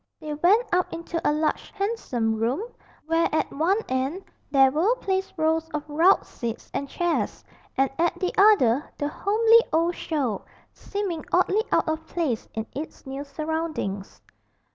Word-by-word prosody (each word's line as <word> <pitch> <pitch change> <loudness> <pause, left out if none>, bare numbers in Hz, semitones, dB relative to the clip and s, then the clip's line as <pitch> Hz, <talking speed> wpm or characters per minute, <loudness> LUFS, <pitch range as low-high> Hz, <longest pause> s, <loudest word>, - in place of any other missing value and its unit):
They 305 -1 -5
went 375 +10 +4
up 360 0 +2
into 335 0 -4
a - - +3
large 305 +1 -1
handsome 330 - -1
room, 240 - 0 0.4
where 330 +1 +2
at 315 - 0
one 335 +8 +2
end 265 +9 -1 0.3
there 270 -2 +5
were 355 - +2
placed 385 -4 -2
rows 320 +1 +1
of 300 0 -4
rout 330 +6 +4
seats 230 -1 -6
and 280 - -3
chairs, 345 +2 -1 0.3
and 270 +1 +4
at 340 0 +1
the 365 - -1
other 300 - +5
the 290 - -1
homely 445 +7 +4
old 335 +2 +2
show, 275 - -2 0.3
seeming 390 -6 -4
oddly 375 +4 +3
out - - +2
of 315 0 -2
place 295 -10 -2
in 220 0 -2
its 300 +2 -7
new 270 +1 -5
surroundings. 305 -9 -4
320 Hz, 155 wpm, -25 LUFS, 275-365 Hz, 0.4 s, there